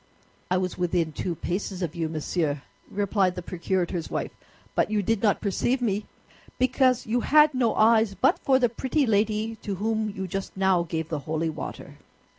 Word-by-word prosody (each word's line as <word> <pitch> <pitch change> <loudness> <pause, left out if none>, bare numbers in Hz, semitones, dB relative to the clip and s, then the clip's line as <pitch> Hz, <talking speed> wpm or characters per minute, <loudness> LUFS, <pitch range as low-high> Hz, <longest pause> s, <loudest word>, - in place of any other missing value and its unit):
"I 180 - +2
was 185 0 -2
within 175 -2 +1
two 170 +3 -3
paces 185 +3 -3
of 165 -2 -3
you, 165 -3 -2
monsieur," 155 -2 -2 0.3
replied 195 -2 +1
the 180 - -5
procurator's 175 -1 -2
wife; - - -3 0.4
"but - - +1
you 210 -1 0
did 220 +1 0
not 205 -3 +2
perceive 240 +6 0
me 210 -4 -1 0.5
because 255 0 +2
you 235 +3 +1
had 300 +3 +5
no 245 -3 +1
eyes 220 -2 +4
but 265 - +3
for 265 -1 +3
the 250 -2 +3
pretty 260 +5 0
lady 220 0 +1
to 205 -2 -4
whom 220 +2 -1
you 190 -2 -5
just 195 +1 -5
now 190 -2 +3
gave 160 -1 -3
the 155 -3 -2
holy 160 +1 0
water." - - -8
195 Hz, 180 wpm, -26 LUFS, 175-225 Hz, 0.5 s, had